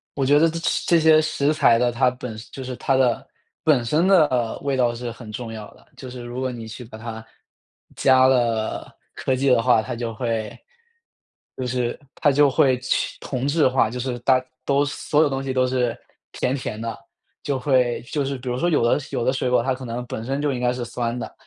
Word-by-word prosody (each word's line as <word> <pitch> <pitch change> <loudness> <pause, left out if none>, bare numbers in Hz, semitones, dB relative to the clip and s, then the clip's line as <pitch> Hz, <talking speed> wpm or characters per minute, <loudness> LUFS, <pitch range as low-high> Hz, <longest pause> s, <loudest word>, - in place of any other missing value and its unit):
我 135 - 0
觉 145 +2 +5
得 165 +1 +4
这 165 - -5 0.3
这 170 -1 +5
些 155 0 +6
食 155 -1 0
材 120 -6 +4
的， 120 +1 +2
它 125 +1 +3
本 125 -3 -7 0.2
就 135 - -7
是 130 0 -5
它 135 - +1
的 125 -3 +2 0.4
本 140 -6 +3
身 155 +9 +2
的 130 -11 +3
味 140 -1 -1
道 120 -2 +2
是 120 0 -5
很 115 -1 -11
重 115 0 -6
要 110 -2 -8
的。 - - -22
就 130 0 -8
是 125 -1 -8
如 120 +1 -6
果 130 0 -1
你 120 -2 -7
去 110 +3 -8
把 110 -1 -11
它 110 0 -7 0.7
加 130 -1 +5
了 120 -4 +1 0.3
科 130 - 0
技 135 +1 +1
的 120 -2 +4
话， 120 -2 +4
它 125 +1 -5
就 115 -1 -4
会 115 -2 -3 1.0
就 130 - -3
是 125 -1 -2 0.2
它 145 - +3
就 145 0 +4
会 130 -1 +3
去 130 - -1
同 130 -1 -4
质 145 +1 +3
化。 130 -3 +2
就 125 +2 -5
是 125 0 -3
大 130 +1 +3 0.2
都 140 +2 +2
所 145 +1 0
有 155 - +3
东 135 0 -3
西 135 - -3
都 130 0 +2
是 125 -2 0 0.3
甜 130 - -1
甜 110 -5 -5
的。 115 0 -4 0.5
就 140 -2 -1
会 125 -2 +1
就 140 +3 -2
是 135 0 -3
比 125 0 -6
如 125 - -1
说， 175 +6 +1
有 150 -7 +2
的 120 - +3
有 115 - -1
的 130 - +2
水 130 -1 -1
果 125 - +3
它 130 - 0
可 130 0 -8
能 120 +1 -4
本 110 - -5
身 135 +3 -2
就 145 -1 +1
应 125 - -3
该 125 0 +1
是 125 -1 -4
酸 120 0 -3
的， 110 -3 -6
125 Hz, 245 characters per minute, -22 LUFS, 120-135 Hz, 1.0 s, 些